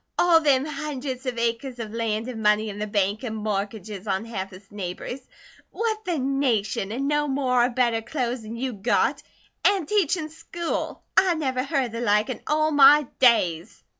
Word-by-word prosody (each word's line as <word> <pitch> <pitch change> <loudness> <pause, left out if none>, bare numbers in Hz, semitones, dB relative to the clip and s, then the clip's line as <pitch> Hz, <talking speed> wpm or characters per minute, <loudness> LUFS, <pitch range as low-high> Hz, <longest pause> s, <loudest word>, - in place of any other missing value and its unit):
All 345 -2 +5
them 280 -3 +3
hundreds 275 -3 -5
of 245 -2 -2
acres 235 +2 -2
of 220 -2 -6
land 225 0 -2
an' 235 -3 -5
money 210 +1 +3
in 205 0 -7
the 210 - -2
bank 205 +1 0
an' 220 -3 -4
mortgages 210 -1 -4
on 195 +2 -1
half 195 -4 -5
his 195 +2 -15
neighbours. 205 +6 -5 0.5
Whut 440 -1 -2
the 350 -3 -1
nation! 255 -8 0
An' 260 +5 -2
no 295 0 +1
more 260 -3 +2
of 245 -1 -3
better 235 -3 +2
clo's 245 -1 -3
an' 220 +2 -7
you 255 +1 -2
got! 210 +3 +1 0.4
An' 395 -5 +3
teachin' 335 -4 +1
school! 330 +1 -4
I 365 -3 +4
never 260 -5 -1
heard 275 -2 0
of 235 - -7
the 230 +1 -5
like 210 +1 +2
in - - -7
all 310 +1 +2
my 290 0 +7
days!" 180 -10 +2
245 Hz, 185 wpm, -24 LUFS, 215-285 Hz, 0.5 s, my